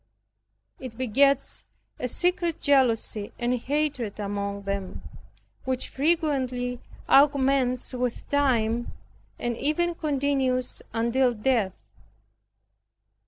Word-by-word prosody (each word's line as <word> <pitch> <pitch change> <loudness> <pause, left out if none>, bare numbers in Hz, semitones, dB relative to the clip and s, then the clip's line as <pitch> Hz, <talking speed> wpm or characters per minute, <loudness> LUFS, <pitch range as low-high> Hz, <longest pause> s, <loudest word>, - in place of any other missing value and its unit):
It 250 -4 -8
begets 270 +3 +2 0.4
a 250 - -1
secret 350 +3 0
jealousy 230 -6 +2
and 240 +1 0
hatred 260 -4 -2
among 200 0 -3
them, 195 -1 -4 0.6
which 260 -1 -2
frequently 265 -5 0 0.3
augments 270 -3 +3
with 250 -1 -3
time, 240 -5 +1 0.4
and 240 -1 -2
even 325 +7 0
continues 275 -5 0
until 235 +2 +1
death. 215 -4 +1
255 Hz, 85 wpm, -26 LUFS, 230-280 Hz, 0.6 s, augments